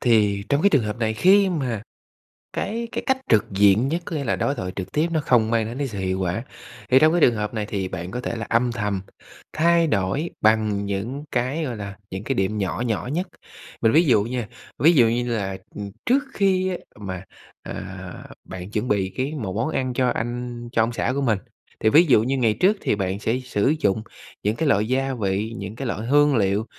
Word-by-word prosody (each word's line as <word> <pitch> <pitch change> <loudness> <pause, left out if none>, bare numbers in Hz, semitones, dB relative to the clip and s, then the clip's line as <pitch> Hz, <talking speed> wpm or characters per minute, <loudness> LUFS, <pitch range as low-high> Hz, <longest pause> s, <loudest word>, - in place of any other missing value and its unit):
Thì 105 -4 +3
trong 140 +2 +2
cái 200 - +5
trường 145 -8 +4
hợp 105 +3 -4
này, 110 -1 0
khi 195 - +5
mà 130 - -2 0.7
cái 230 +2 -3
cái - - -3
cách 265 -1 +3
trực 105 -3 +4
diện 100 +5 +4
nhất, 165 +5 -1
có - - -5
nghĩa 145 - -2
là 125 - 0
đối 140 - 0
thoại 90 -6 -4
trực 95 -1 -5
tiếp 155 +3 +1
nó 160 - +1
không 115 -3 +3
mang 115 -1 +2
đến 115 +3 -6
cái 140 -1 -1
sự 105 -6 -6
hiệu 95 0 -1
quả, 95 +4 -1 0.5
thì 130 - +6
trong 155 +2 +5
cái 175 - +2
trường 120 - +5
hợp 105 0 -3
này 110 -2 -2
thì 100 -3 -3
bạn 90 -1 -6
có 125 - -4
thể 120 - -3
là 115 - -4
âm 120 +1 +2
thầm 105 -5 -2 0.5
thay 170 +1 +3
đổi 110 - 0
bằng 110 -2 +2
những 110 +9 -3
cái, 130 +6 0
gọi 120 -5 -4
là, 100 -1 -7
những 95 +2 -5
cái 135 +3 -1
điểm 95 +1 0
nhỏ 100 +2 -2
nhỏ 115 +2 -2
nhất. 180 +3 -1 0.5
Mình 110 - +4
ví 160 +6 +5
dụ 115 -8 +4
nha, 120 0 -3 0.3
ví 165 +4 +6
dụ 120 -6 +6
như 120 +1 0
là, 95 -2 -3 0.2
ừm, 100 -1 -6
trước 270 +3 +3
khi 185 -2 +1 0.2
mà, 95 -3 -5 0.4
à, - - -7 0.3
bạn 95 +1 -8
chuẩn 110 +3 -1
bị 95 -3 0
cái 135 +3 -1
một 105 -10 -4
món 115 +7 0
ăn 130 -4 -1
cho 125 0 +1
anh, 120 +1 -4
cho 115 -3 +3
ông 115 +1 -2
xã 115 - 0
của 140 - 0
mình, 110 -7 +1 0.4
thì 110 - +4
ví 155 +9 +7
dụ 125 -8 +5
như 135 +3 0
ngày 115 -4 +3
trước 200 +3 +4
thì - - +1
bạn 95 -1 -2
sẽ 115 +4 0
sử 130 +1 +1
dụng 100 -2 +1 0.4
những 105 +2 +1
cái 160 +3 -1
loại 105 -3 +2
gia 135 +2 0
vị, 105 -1 -1
những 100 +1 -6
cái 135 +2 -4
loại 115 -1 -3
hương 145 +1 +4
liệu 100 0 +1
115 Hz, 230 wpm, -23 LUFS, 105-135 Hz, 0.7 s, ví